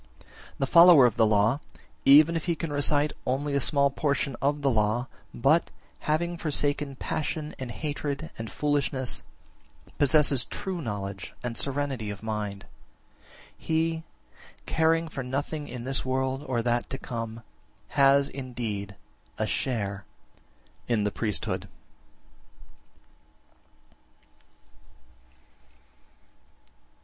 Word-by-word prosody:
20. - - -22 0.3
The 135 - 0
follower 170 -2 +8
of 120 - +2
the 110 -1 +4
law, 105 +5 +3 0.5
even 150 +4 +7
if 165 - -2
he 170 -2 +1
can 160 -1 -4
recite 145 +1 +2
only 140 +3 -1
a 140 - +2
small 140 +1 +3
portion 140 -2 -1
(of 145 +2 0
the 140 - +4
law), 110 +2 +1 0.3
but, 145 +8 +2 0.3
having 170 +3 -1
forsaken 145 -2 -1
passion 155 +2 -3
and 130 -2 -5
hatred 145 +3 -4
and 115 -1 -7
foolishness, 140 -3 -1 0.8
possesses 140 -2 +5
true 185 -3 -5
knowledge 100 -5 -5
and 120 -1 -3
serenity 135 -4 -1
of 105 +1 -7
mind, 105 -2 -4 0.9
he, 160 0 -1 0.6
caring 165 +1 +2
for 145 -4 -5
nothing 145 +4 -3
in 120 -1 -7
this 135 +1 0
world 130 +1 -1
or 120 -3 0
that 120 0 0
to 135 - -4
come, 115 -3 -6 0.5
has 140 0 +4
indeed 115 -8 -5 0.4
a - - 0
share 100 -6 -2 0.8
in 115 -4 +1
the 105 - 0
priesthood. 105 -7 -2
135 Hz, 115 wpm, -27 LUFS, 115-150 Hz, 0.9 s, follower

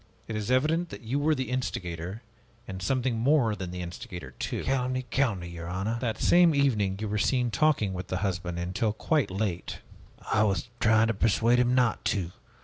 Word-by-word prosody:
It 110 - -4
is 105 0 -3
evident 155 +7 +2
that - - -9
you 125 +6 -1
were 155 +2 +2
the 130 -2 -3
instigator, 95 -5 -4 0.4
and 95 0 -6
something 125 +3 0
more 120 -3 +3
than 95 -3 -5
the 90 0 -5
instigator, 85 -4 -8
too." - - -3
"Calumny, 130 -1 -1
calumny, 105 -11 0
your 85 -1 -7
honor!" 100 +6 -2
"That 115 -3 -1
same 175 -3 +5
evening 105 -9 +2
you 110 - -3
were 105 +1 -1
seen 125 +1 +1
talking 135 -11 +2
with 90 0 -5
the 90 - -2
husband 90 -2 -2
until 90 +5 -1
quite 150 +6 0
late." 95 -2 -3 0.6
"I 105 - +4
was 100 0 0
trying 110 0 +4
to - - +2
persuade 115 +3 +3
him 125 0 +3
not 125 -4 +2
to. 90 -4 0
110 Hz, 190 wpm, -28 LUFS, 95-130 Hz, 0.6 s, same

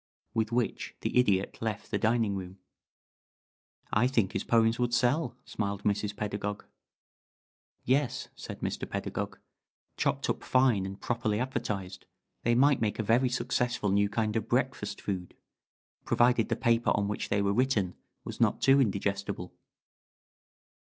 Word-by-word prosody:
With 110 -1 0
which 120 0 -1
the - - -2
Idiot 100 -6 +2
left 110 -2 -3
the - - 0
dining 110 -2 +2
room. 95 0 -6 1.4
"I 115 +4 +4
think 115 -7 +1
his - - -1
poems 115 0 +3
would 120 -1 +1
sell," 130 +7 +1
smiled 100 -1 -3
Mrs. 105 0 0
Pedagog. 105 0 -3 1.2
"Yes," 135 +1 +1
said - - -8
Mr. - - -3
Pedagog. - - -3 0.6
"Chopped - - 0
up - - -2
fine 125 -7 +3
and 95 +1 -8
properly 115 -3 -1
advertised, 100 -7 -3 0.3
they 120 0 +2
might 140 +1 +4
make 105 -2 0
a 110 - -1
very 120 +4 +3
successful 120 -4 0
new 100 +1 +3
kind 110 0 -1
of 110 0 -2
breakfast 120 -4 -1
food 90 -3 -4 0.7
provided 120 -2 +3
the - - +1
paper 115 -1 +2
on 100 -1 0
which 105 - -3
they 100 0 +2
were 100 0 +2
written 110 -6 +1 0.3
was - - -7
not - - +3
too 135 +1 +5
indigestible." 100 -4 -2
110 Hz, 145 wpm, -29 LUFS, 100-120 Hz, 1.4 s, too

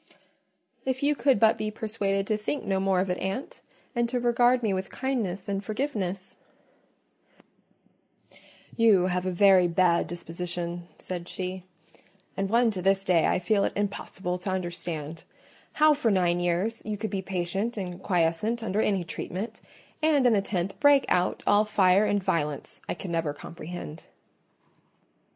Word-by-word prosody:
"If 260 +1 -2
you 295 +1 +4
could 260 -3 +3
but 220 +1 +4
be 215 0 -1
persuaded 210 -2 -2
to 215 - 0
think 215 +7 -3
no 195 -2 0
more 190 -1 +2
of 190 -1 -1
it, 180 - -2
aunt, 195 +8 -4 0.3
and 240 0 +1
to 250 0 -1
regard 245 +1 +3
me 210 -3 +1
with 190 0 -3
kindness 220 -9 -2
and 200 0 -2
forgiveness——" 205 -6 -3 2.4
"You 215 -6 +5
have 180 0 -1
a - - 0
very 185 -1 +5
bad 170 0 +2
disposition," 175 0 -5
said 175 -2 -6
she, 185 0 -5 0.7
"and 195 0 -1
one 230 +1 +3
to 190 -3 -4
this 195 +1 +2
day 175 -4 +3
I - - +2
feel 200 +2 +1
it - - 0
impossible 190 -3 -3
to 190 - -4
understand: 170 -4 -4 0.5
how 310 0 +5
for 280 -6 0
nine 175 -3 +2
years 175 +6 -1
you 215 -1 -3
could 220 +1 -4
be 195 -2 -2
patient 195 +5 -2
and 180 -2 -5
quiescent 180 +6 0
under 210 0 0
any 195 -4 +1
treatment, 185 +5 -6 0.4
and 305 -4 +3
in 245 - +5
the 200 - +3
tenth 195 -1 -3
break 285 -1 +5
out 180 0 +1
all 205 +1 +5
fire 200 -1 +4
and 205 -1 0
violence, 150 -5 -2
I - - -1
can 175 +1 -7
never 165 -3 -1
comprehend." 165 0 -8
195 Hz, 160 wpm, -27 LUFS, 180-220 Hz, 2.4 s, You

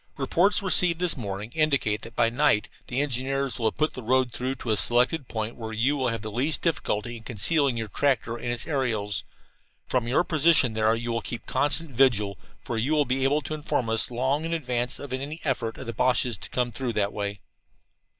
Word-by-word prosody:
"Reports 175 +9 +2
received 180 -3 +3
this 180 -2 +3
morning 105 -2 -5
indicate 140 -9 +1
that 115 +1 -11
by 115 - +3
night 120 -3 +2 0.2
the 125 +3 0
engineers 135 -1 -1
will 115 - +1
have 110 - -2
put 155 +1 +1
the 130 - -6
road 125 +1 +2
through 130 +3 -3
to 120 -3 -4
a - - +3
selected 125 +8 +2
point 110 0 -3
where 110 -2 -6
you 125 +6 +1
will 130 -3 0
have 115 -2 -2
the 110 - -5
least 135 +8 +1
difficulty 120 -8 -1
in - - -12
concealing 130 +4 +2
your 110 -1 -3
tractor 120 0 0
and 120 0 -4
its 120 -1 -2
aerials. 115 - -1 0.6
From 125 -2 0
your 130 +8 +3
position 155 -7 +4
there 110 +1 +2
you 120 +1 -3
will 115 0 -1
keep 120 +1 -6
constant 150 +2 +1
vigil, 110 -7 +2 0.2
for 115 - -3
you 135 +8 0
will 150 -1 +3
be 130 +1 -1
able 145 +3 +2
to 150 - -5
inform 135 -6 -1
us 115 - +3
long 130 +5 0
in 165 +1 -2
advance 125 -5 -2
of 140 -2 -7
any 140 +5 -4
effort 120 -6 -2
of 130 - -8
the 115 - -5
Boches 125 +1 +2
to 100 - -8
come 125 -1 -1
through 120 0 -3
that 105 -1 0
way. 100 -1 -3
125 Hz, 215 wpm, -26 LUFS, 115-140 Hz, 0.6 s, position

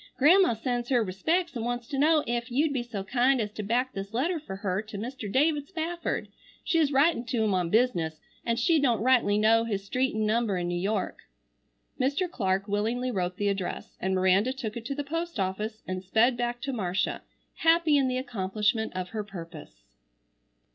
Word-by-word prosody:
"Grandma 330 -1 +5
sends 240 +1 -2
her 245 -4 +3
respecks 320 - -1
and 230 - -3
wants 240 0 -3
to 275 - -3
know 305 +1 +4
ef 235 +1 -2
you'd 285 +4 +1
be 260 - 0
so 230 -5 -5
kind 250 +5 +2
as 210 -2 -2
to 215 - -6
back 245 +5 0
this 200 +2 -6
letter 330 +7 0
fer 240 -10 -7
her 195 -1 -2
to 215 -1 -9
Mr. 230 -1 -5
David 290 +2 +2
Spafford. 340 -1 -3 0.4
She's 320 -4 +2
writin' 280 -2 +3
to 230 -1 0
him 210 -2 +1
on 180 -2 0
business 175 -9 +1 0.2
an' 230 - 0
she 310 +7 +3
don't 240 -7 +2
rightly 245 -5 +4
know 225 +2 +4
his 205 -4 -2
street 255 +3 0
an' 215 0 0
number 215 -2 +1
in 175 -1 -2
New - - -2
York." 200 0 -1 0.8
Mr. 280 +8 +1
Clark 195 - -1
willingly 225 +5 -1
wrote 180 -3 -2
the 205 0 +1
address, 195 -2 -4
and 190 +1 0
Miranda 190 +6 +3
took 235 -5 -5
it 235 -1 -6
to 275 - -3
the 290 - -3
post 330 -1 -4
office, 210 +4 -3
and 185 0 -3
sped 225 +6 +3
back 240 0 -2
to 275 0 -3
Marcia, 190 -5 -1 0.4
happy 325 -2 +4
in 275 -2 +3
the 255 0 -1
accomplishment 220 -2 -1
of 185 -1 -3
her 215 -2 -3
purpose. 165 - -10
230 Hz, 195 wpm, -28 LUFS, 200-265 Hz, 0.8 s, Grandma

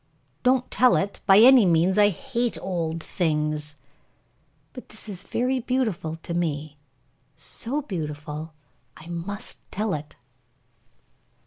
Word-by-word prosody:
"Don't 250 0 +2
tell 255 0 +5
it, 200 +1 -1
by 195 - +8
any 250 +2 +8
means. 175 +1 +3
I 205 0 +7
hate 235 +5 -2
old 165 -3 -3
things." 150 -3 -1 1.0
"But 250 - -10
this 215 +1 -8
is 195 -3 -7
very 255 +5 0
beautiful 225 -11 -1
to 170 - -4
me 155 -3 -2 0.6
so 285 +6 -3
beautiful 150 - -5 0.5
I 155 - -13
must 200 +7 -5
tell 210 +1 -1
it." 150 0 -6
185 Hz, 120 wpm, -25 LUFS, 155-230 Hz, 1.0 s, by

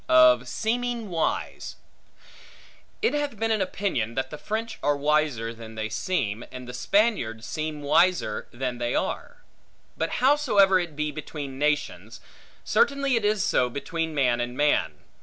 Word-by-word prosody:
Of 125 -1 +6
Seeming 235 - -2
Wise 165 -2 -2 1.3
IT 450 - +3
HATH 290 -5 -2
been 225 +2 0
an 215 -2 +1
opinion, 180 - -1
that 130 0 -2
the 150 - -7
French 220 +1 -4
are 145 0 +2
wiser 145 -6 +1
than 110 -1 -11
they 110 0 -3
seem, 115 - -2
and 125 -1 -8
the 125 - -7
Spaniards 125 - +1
seem 155 +3 -4
wiser 155 -6 +2
than 125 -1 -4
they 120 0 -1
are. - - -3 0.5
But 165 - -2
howsoever 245 -9 +4
it 170 -4 -4
be 150 0 -1
between 145 -2 -7
nations, 150 0 -1 0.4
certainly 280 - +2
it 230 - 0
is 210 -1 +2
so 125 -10 +2
between 160 +4 -3
man 125 -4 +2
and 120 +1 -4
man. 145 - +2
150 Hz, 150 wpm, -26 LUFS, 125-205 Hz, 1.3 s, Of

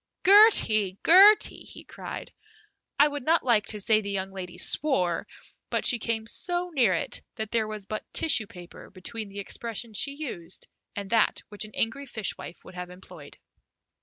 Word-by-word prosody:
"Gertie, 230 - +5
Gertie!" 395 +5 +6
he - - -12
cried. - - -9 0.7
I 290 - +6
would 290 -2 -6
not 325 +5 +2
like 215 -5 +2
to 210 - -4
say 215 +2 +2
the 200 - -7
young 195 -1 -4
lady 185 -2 -8
swore, 180 - +1 0.4
but - - -2
she 240 - +3
came 225 0 -3
so 350 +8 -3
near 235 - +3
it - - -3
that 220 -1 -5
there 225 -2 0
was 215 -2 -7
but 215 +2 -7
tissue 260 -9 +3
paper 180 -2 -13
between 205 +3 -5
the 200 - -12
expression 225 +2 -4
she 280 +7 0
used 190 - -8 0.3
and 200 -1 -6
that 225 -2 +2
which 210 0 -3
an 215 - -14
angry 275 +5 -2
fish 220 -5 -3
wife 170 - -11
would 185 - -13
have 180 0 -7
employed. 180 +1 -13
215 Hz, 175 wpm, -26 LUFS, 195-280 Hz, 0.7 s, Gertie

